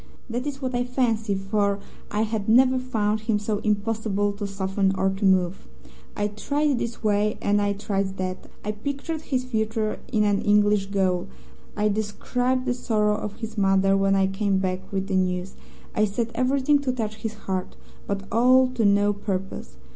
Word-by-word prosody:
That 245 +4 -2
is 275 -1 -5
what 255 0 -2
I 245 0 +1
fancy, 230 -5 0
for 200 +1 0 0.3
I 210 +1 0
had 220 -2 -2
never 255 +3 +5
found 220 -4 0
him 220 0 0
so 210 0 -2
impossible 210 -1 0
to 205 0 -4
soften 195 0 0
or 190 0 +1
to 195 +2 -5
move. 185 -1 +2 0.5
I 205 0 0
tried 285 +5 0
this 230 0 -4
way 210 0 +2
and 205 0 +2
I 205 0 +1
tried 195 -1 -2
that; 185 0 -4 0.2
I 210 - 0
pictured 280 +8 -4
his 260 -5 -1
future 220 -3 -1
in 215 -3 +3
an 205 -1 +2
English 205 -1 +3
gaol; 190 -3 0 0.5
I 210 0 +2
described 245 +5 -1
the 250 - +1
sorrow 215 -4 +1
of 210 -1 -5
his 220 -1 -4
mother 195 0 +4
when 195 0 +3
I 195 0 +3
came 195 0 0
back 185 -1 -2
with 195 -1 -1
the 195 -1 -2
news; 185 0 0 0.4
I 215 - +3
said 225 +3 -2
everything 270 +4 +2
to 275 -2 -1
touch 220 -4 -3
his 220 0 -4
heart, 190 -3 -4 0.3
but 200 -1 -2
all 255 +3 +5
to 250 -3 -1
no 205 0 +4
purpose. 190 - -4
210 Hz, 180 wpm, -25 LUFS, 195-235 Hz, 0.5 s, never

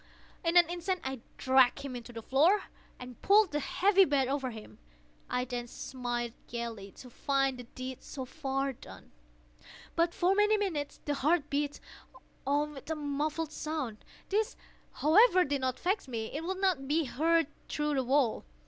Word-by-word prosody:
In 335 +1 +3
an 345 -2 +7
instant 355 +2 -2
I 265 -1 -4 0.2
dragged 260 0 +4
him 255 -3 -5
to 235 - -12
the 230 -1 -8
floor, 325 - +4 0.3
and 250 -2 -10
pulled 405 -1 +5
the 295 - 0
heavy 390 +7 +4
bed 280 -6 +2
over 270 -1 -1
him. 215 - -11 0.5
I 250 0 0
then 245 -1 -4
smiled 240 -2 -4
gaily, 230 -4 -5
to 250 - -12
find 270 0 0
the 245 - -8
deed 255 +1 -7
so 265 -2 -6
far 270 -1 -2
done. - - -14 0.8
But, 335 +1 +2
for 365 +2 +3
many 420 +1 +4
minutes, 330 -9 -2
the 290 - 0
heart 300 +2 +1
beat 285 0 -1 0.7
on 295 +2 +1
with 285 +1 -11
a 320 - 0
muffled 300 +2 -2
sound. 300 -9 -4 0.3
This, 425 +2 0 0.4
however, 370 +4 +5
did 280 -1 -1
not 255 -1 -1
vex 385 -2 0
me; 225 -3 -4
it 310 - -3
would 375 +1 -2
not 360 -9 +1
be 315 +3 +2
heard 325 +5 +2 0.2
through 300 0 -1
the 265 -2 +1
wall. 260 -2 +2
285 Hz, 170 wpm, -31 LUFS, 255-335 Hz, 0.8 s, an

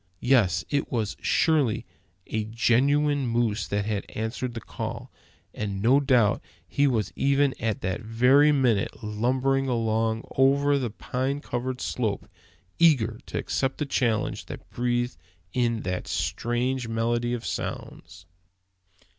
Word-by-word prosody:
Yes, 100 -10 +3
it 145 -1 0
was 110 -4 -1
surely 140 -8 +2 0.4
a 110 -1 -2
genuine 135 +5 +2
moose 115 -2 0
that 100 0 -1
had 105 -2 -3
answered 120 +3 -4
the - - -3
call; - - -6 0.4
and 100 -2 -3
no 125 +7 +4
doubt 125 -7 +3 0.3
he 140 +12 +2
was 110 -7 0
even 140 0 +2
at 110 -3 -1
that 95 +4 -2
very 125 +7 +4
minute 125 -8 +1
lumbering 130 +5 0
along 115 -2 0
over 140 +1 +4
the 125 -3 -2
pine 130 +6 -3
covered 125 -1 -4
slope, 110 -5 -2 0.5
eager 120 -9 +4
to - - -4
accept 135 -1 -1
the 150 - -1
challenge 115 -5 -1
that - - -9
breathed 120 0 -1 0.4
in 120 -3 +1
that 90 0 -3
strange 125 +1 -1
medley 120 +1 0
of 120 -2 -4
sounds! 85 +1 -6
120 Hz, 130 wpm, -26 LUFS, 110-135 Hz, 0.5 s, no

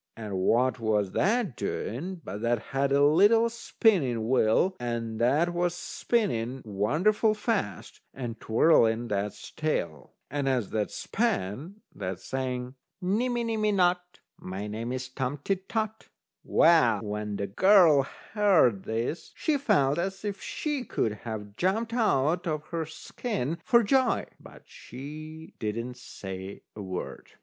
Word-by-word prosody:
And 105 -4 -4
what 125 +6 +2
was 105 -4 +1
that 210 - +1
doing, 170 - -4
but 100 +3 -6
that 120 +1 +2 0.2
had 135 0 +1
a 140 +1 +5
little 205 +10 +5
spinning 170 - +1
wheel, 130 - +3
and 115 -2 -3
that 150 +9 +3
was 175 0 0
spinning 135 - -1
wonderful 165 - +2
fast, 210 - -3
and 120 -4 -6
twirling 115 -2 +3
that's 100 0 -3
tail. 85 - -3 0.2
And 145 -2 0
as 125 -6 0
that 105 -1 -1
span 195 - -2
that 95 -2 -5
sang: 125 -1 -3 0.3
"Nimmy 235 +6 0
nimmy 215 -2 +1
not, 180 -1 +3 0.4
My 95 +3 -5
name's 120 +4 -4
Tom 130 +2 -3
Tit 190 -1 -2
Tot." 220 -1 -2 0.4
Well, 160 -9 +4
when 105 0 -3
the 100 - -2
girl 170 - +6 0.3
heard 180 - +4
this, 115 +9 -3
she 310 - 0
felt 145 - +2
as 195 +3 -3
if 200 -2 -4
she 295 -4 -3
could 110 - -1 0.2
have 105 -2 -6
jumped 220 +6 0
out 175 - +2
of 155 -1 -2
her 165 -2 -3
skin 165 - -4
for 235 0 +4
joy, 255 +3 +2
but - - -14
she 155 +5 -10
didn't 115 +3 -3
say 95 -5 -8
a 105 - -7
word. 95 -2 -6
140 Hz, 135 wpm, -28 LUFS, -, 0.4 s, girl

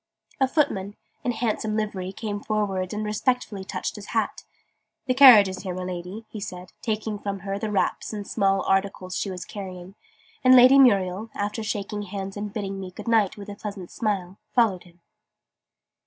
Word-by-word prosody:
A 265 - +4
footman, 205 -9 0 0.3
in 245 - +1
a - - -6
handsome 220 -2 -1
livery, 195 -4 -2
came 205 0 -5
forwards 195 -4 -1
and 215 0 -3
respectfully 215 -1 -1
touched - - -4
his - - -9
hat. - - -1 0.6
"The 255 - +2
carriage 250 -7 +9
is 190 0 -5
here, 185 -2 -4
my 185 - -4
Lady," 180 +4 -6
he 215 - -6
said, 180 -3 -7
taking 215 -2 -2
from 200 -2 -4
her 195 0 -3
the 215 - -2
wraps 205 - 0
and 205 -2 -6
small 195 -2 +1
articles 195 -1 0
she 200 - -2
was 185 -1 -6
carrying: 185 -2 -8 0.5
and 255 0 +8
Lady 255 +2 +8
Muriel, 200 -4 +4
after 205 +2 -2
shaking 210 -1 -3
hands 195 -1 -5
and 205 0 -4
bidding 195 -2 -4
me 190 -1 -6
"Good 185 - -10
night!" 220 -4 +3
with 200 0 -9
a 205 - -6
pleasant 200 -3 -7
smile, 195 -4 -2 0.2
followed 215 -8 +2
him. 175 0 -21
205 Hz, 185 wpm, -25 LUFS, 190-220 Hz, 0.6 s, carriage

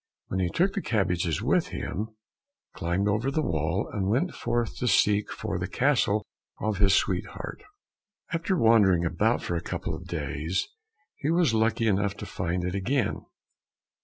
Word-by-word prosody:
Then 95 - 0
he 90 -2 +1
took 190 - +1
the 200 - -2
cabbages 90 - 0
with - - +2
him, 110 +3 -4 0.6
climbed 90 +4 -1
over 110 +6 +1
the 155 +3 0
wall, 85 - 0
and 95 -2 -1
went 140 - +1
forth 120 -1 -1
to 125 - -1
seek 105 0 +3
for - - -3
the - - -2
castle 105 +1 +2 0.3
of 105 -3 -1
his 100 -2 +5
sweetheart. - - -2 0.7
After 165 +3 0
wandering 100 - +5
about 80 - +1
for 85 - -2
a 85 - -1
couple - - -4
of - - -7
days 80 +6 -2 0.5
he 145 - -2
was 165 -7 +3
lucky 115 +1 +2
enough 100 -1 +1
to - - -6
find 90 0 -2
it 90 0 -2
again. 105 +4 -1
105 Hz, 160 wpm, -27 LUFS, 90-115 Hz, 0.7 s, his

